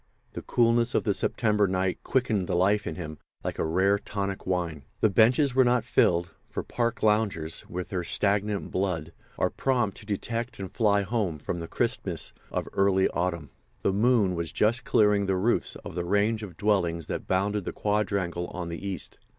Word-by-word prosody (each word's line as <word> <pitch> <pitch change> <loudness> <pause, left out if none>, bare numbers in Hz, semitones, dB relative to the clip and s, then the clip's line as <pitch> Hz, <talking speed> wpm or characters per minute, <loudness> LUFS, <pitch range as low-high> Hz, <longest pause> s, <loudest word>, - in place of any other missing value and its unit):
The - - -5
coolness 120 0 +2
of - - +2
the 105 - +1
September 105 0 +1
night 95 0 0
quickened 115 -8 0
the - - 0
life 100 +3 +2
in - - -3
him 80 -4 -7 0.2
like - - -4
a - - +2
rare, 95 +5 +2
tonic 100 -2 -4
wine. 85 -6 -1 0.2
The 110 - +3
benches 125 +6 +4
were 130 0 +5
not 125 -1 +2
filled; 85 -1 +2 0.2
for - - -4
park 120 -2 -2
loungers, 105 -7 +1
with 90 0 -5
their 90 -2 -2
stagnant 100 +3 0
blood, 85 -4 -2 0.2
are - - +1
prompt 120 -7 0
to 105 - -13
detect 115 +4 -3
and 95 -2 -6
fly 100 -3 +2
home 100 -6 -1
from 85 +4 -4
the 85 - -5
crispness - - -2 0.2
of - - -3
early 95 -1 +3
autumn. 85 -5 -2 0.3
The 95 - +2
moon 105 -2 +3
was 85 -2 -3
just 115 +3 +1
clearing 105 -2 +3
the 95 - +2
roofs 105 +6 0
of - - -6
the 85 +1 -2
range 105 +5 +1
of 95 -6 -8
dwellings 85 -6 +1
that - - -5
bounded 100 +1 0
the - - -2
quadrangle 100 -4 -1
on 90 -2 -5
the 85 +2 -6
east. 95 -5 -5
100 Hz, 185 wpm, -27 LUFS, 90-110 Hz, 0.3 s, were